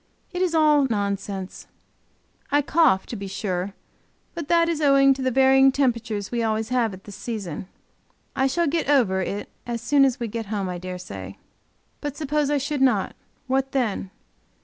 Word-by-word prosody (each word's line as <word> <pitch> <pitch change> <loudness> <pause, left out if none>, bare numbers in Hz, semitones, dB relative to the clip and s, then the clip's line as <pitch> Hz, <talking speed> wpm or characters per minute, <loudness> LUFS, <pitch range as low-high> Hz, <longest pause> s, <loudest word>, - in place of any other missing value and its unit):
It 360 - -3
is 355 -3 +1
all 300 -3 +4
nonsense. 200 -2 -3 0.8
I 290 +1 +3
cough, 285 - +3
to - - -6
be 200 -2 -6
sure; 195 -1 -3 0.6
but 335 -4 -6
that 335 0 +4
it - - +1
is 315 -2 -3
owing 275 -1 +5
to 265 - -7
the 260 - +1
varying 265 +1 +5
temperature 235 -5 0
we 240 -1 -1
always 220 0 -1
have 245 -3 +1
at 185 - -16
this 205 - -10
season. 195 -7 -5 0.7
I 265 - +2
shall 340 +6 +1
get 320 0 -1
over, 220 -10 +3
it 200 +2 -4 0.2
as 235 -1 -2
soon 275 +4 +3
as 270 -1 +2
we 235 - -2
get 225 0 -5
home, 200 -2 -2
I 180 -1 -4
dare 185 0 -6
say. 180 - -8 0.6
But 290 -2 -5
suppose 300 -1 0
I 295 - +2
should 285 0 -2
not; 230 -8 +2 0.3
what 265 0 -1
then? 225 -7 -1
255 Hz, 185 wpm, -24 LUFS, 205-285 Hz, 0.8 s, owing